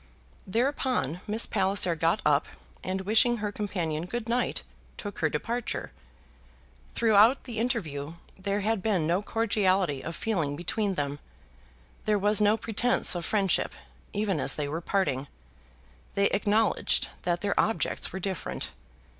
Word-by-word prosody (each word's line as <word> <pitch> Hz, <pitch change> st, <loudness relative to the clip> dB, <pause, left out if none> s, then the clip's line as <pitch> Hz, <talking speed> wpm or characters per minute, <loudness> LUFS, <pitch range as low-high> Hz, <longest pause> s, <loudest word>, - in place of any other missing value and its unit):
Thereupon 235 Hz, -, 0 dB
Miss 220 Hz, +2 st, +2 dB
Palliser 190 Hz, -2 st, +3 dB
got 165 Hz, +1 st, +1 dB
up, 145 Hz, 0 st, +3 dB, 0.4 s
and 190 Hz, +1 st, -2 dB
wishing 225 Hz, +5 st, +3 dB
her 210 Hz, -1 st, -3 dB
companion 175 Hz, -6 st, -3 dB
good 235 Hz, +2 st, -4 dB
night, 245 Hz, +2 st, 0 dB, 0.3 s
took 205 Hz, -2 st, -7 dB
her 160 Hz, -, +2 dB
departure. 235 Hz, -, -3 dB, 1.0 s
Throughout 225 Hz, +3 st, +5 dB
the 235 Hz, -4 st, -5 dB
interview 165 Hz, -, -2 dB, 0.2 s
there 200 Hz, +2 st, -2 dB
had 215 Hz, 0 st, 0 dB
been 190 Hz, -6 st, +1 dB
no 175 Hz, +4 st, +1 dB
cordiality 195 Hz, -9 st, +1 dB
of 165 Hz, -, -5 dB
feeling 165 Hz, -11 st, -1 dB
between 195 Hz, +5 st, -1 dB
them. 145 Hz, -1 st, -3 dB, 0.9 s
There 210 Hz, -1 st, +3 dB
was 205 Hz, +2 st, +3 dB
no 210 Hz, +1 st, +4 dB
pretence 230 Hz, +4 st, +3 dB
of 175 Hz, -2 st, -3 dB
friendship, 195 Hz, -5 st, +2 dB, 0.4 s
even 200 Hz, -5 st, 0 dB
as 135 Hz, -, +1 dB
they 150 Hz, -1 st, -2 dB
were 160 Hz, +4 st, -3 dB
parting. 145 Hz, -8 st, -1 dB, 0.9 s
They 200 Hz, 0 st, +3 dB
acknowledged 210 Hz, +1 st, +2 dB
that 175 Hz, -1 st, -1 dB
their 200 Hz, -1 st, 0 dB
objects 225 Hz, -, +1 dB
were 190 Hz, -, -5 dB
different. 190 Hz, -2 st, -3 dB
200 Hz, 140 wpm, -28 LUFS, 170-220 Hz, 1.0 s, Throughout